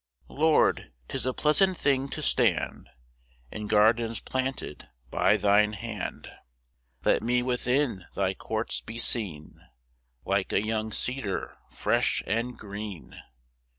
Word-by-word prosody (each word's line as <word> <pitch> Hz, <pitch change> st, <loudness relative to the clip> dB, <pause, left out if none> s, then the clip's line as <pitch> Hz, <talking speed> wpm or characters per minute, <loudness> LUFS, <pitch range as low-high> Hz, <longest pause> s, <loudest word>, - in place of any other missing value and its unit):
1 -, -, -14 dB
Lord, 155 Hz, -, +3 dB, 0.2 s
'tis -, -, -2 dB
a 130 Hz, -, 0 dB
pleasant 185 Hz, +5 st, +3 dB
thing 140 Hz, -2 st, +1 dB
to -, -, -4 dB
stand -, -, +1 dB, 0.6 s
In 105 Hz, -1 st, -5 dB
gardens 110 Hz, +2 st, +3 dB
planted 130 Hz, -, -4 dB, 0.2 s
by 105 Hz, -, +3 dB
thine 105 Hz, +1 st, +3 dB
hand; 105 Hz, -1 st, -5 dB, 0.8 s
Let -, -, +3 dB
me 125 Hz, +2 st, +1 dB
within 125 Hz, -5 st, 0 dB
thy 95 Hz, -1 st, +1 dB
courts 110 Hz, +3 st, -2 dB
be 115 Hz, -, -8 dB
seen 95 Hz, -12 st, -1 dB, 0.6 s
Like 100 Hz, -1 st, 0 dB
a 100 Hz, -, +2 dB
young 110 Hz, 0 st, -1 dB
cedar 110 Hz, -5 st, -2 dB
fresh -, -, +1 dB
and 115 Hz, +4 st, -2 dB
green. 100 Hz, -3 st, -8 dB
110 Hz, 120 wpm, -27 LUFS, 105-125 Hz, 0.8 s, Lord